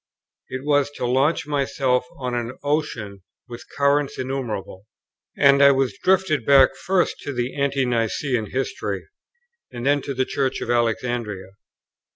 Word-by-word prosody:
It 130 +1 -6
was 145 -1 +2
to - - -3
launch 135 +6 +1
myself 135 -3 0
on 125 -2 -4
an 120 +1 -3
ocean 130 -10 -2 0.3
with 120 -1 -9
currents 140 0 +2
innumerable; 115 -7 -5 0.5
and 140 -1 +5
I 140 - +8
was 135 -2 +1
drifted 185 -8 +2
back 135 0 +5
first 185 -2 0
to 145 - -5
the 125 -1 -3
ante 140 -1 0
Nicene 120 0 -1
history, 130 +1 -3 0.6
and 120 0 -6
then 145 +1 +3
to 140 - -5
the 130 +1 +1
Church 135 -1 -1
of 120 - -3
Alexandria. 115 -4 -1
130 Hz, 145 wpm, -22 LUFS, 120-140 Hz, 0.6 s, I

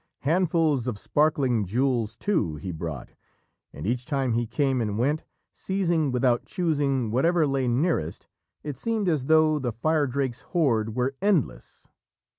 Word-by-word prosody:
Handfuls 160 -4 +1
of 120 -5 -2
sparkling 135 -3 +1
jewels, 115 +1 0
too, 140 - -1
he 85 +5 -6
brought, 80 -5 -6 0.6
and 75 - -8
each 120 +4 -1
time 135 -3 -1
he 120 0 0
came 135 -1 0
and 105 -2 -2
went, 145 +6 0 0.3
seizing 175 -7 0
without 125 -1 +2
choosing, 140 - 0
whatever 165 +7 +3
lay 135 -2 0
nearest, 125 - 0 0.4
it 145 -4 -5
seemed 225 -3 -1
as 150 -6 0
though 155 -1 +4
the 125 -3 -2
Firedrake's 135 -1 -1
hoard 115 - 0
were 125 +2 0
endless. 185 - -1
135 Hz, 140 wpm, -26 LUFS, 120-155 Hz, 0.6 s, though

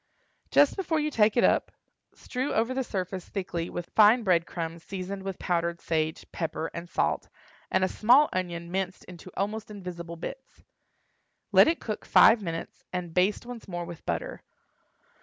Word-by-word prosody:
Just 290 - +5
before 345 -5 0
you 305 0 -1
take 220 -2 +3
it 240 - +5
up, - - +3 0.4
strew 260 +2 -3
over 230 +3 +1
the 265 0 -1
surface 185 -4 -4
thickly 175 -4 -3
with 175 - -6
fine 220 +3 +6
bread 170 -5 +2
crumbs 165 0 -5
seasoned 195 0 -5
with 195 -1 -5
powdered 170 -1 -1
sage, 160 -1 -1
pepper, 160 -1 -3
and 170 +1 -7
salt, - - 0 0.4
and - - +2
a - - +4
small 250 +10 +5
onion 170 -2 -3
minced 190 0 -2
into 180 0 -11
almost 215 +3 -2
invisible 175 -4 -7
bits. 175 - -9 0.9
Let - - +7
it 330 +1 +1
cook 215 -2 -5
five 225 0 +6
minutes 165 -3 -6
and 180 -2 -4
baste 185 +6 +2
once 240 -2 -9
more 175 -2 -4
with 170 -1 -9
butter. - - -3
185 Hz, 165 wpm, -28 LUFS, 170-220 Hz, 0.9 s, Let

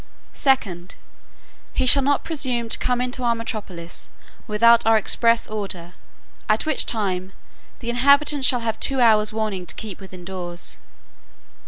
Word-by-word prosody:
"2d, 195 - 0 0.8
He 260 - 0
shall 275 +2 +7
not 285 +1 +1
presume 255 -7 -2
to - - +2
come 250 -1 0
into 250 0 -4
our 235 -1 +1
metropolis, 200 -7 -6 0.4
without 230 +2 +4
our 225 0 +4
express 230 +2 +2
order; 190 -5 -4 0.6
at 215 +1 +1
which 310 -3 +1
time, 190 -4 -3 0.5
the 235 - -5
inhabitants 280 +2 +3
shall 245 -2 +2
have 225 -1 -3
two 270 -1 +1
hours 215 -3 +4
warning 215 -5 -3
to - - -2
keep 215 -4 -8
within 185 -2 -12
doors. 175 -2 -5
225 Hz, 145 wpm, -22 LUFS, 195-250 Hz, 0.8 s, shall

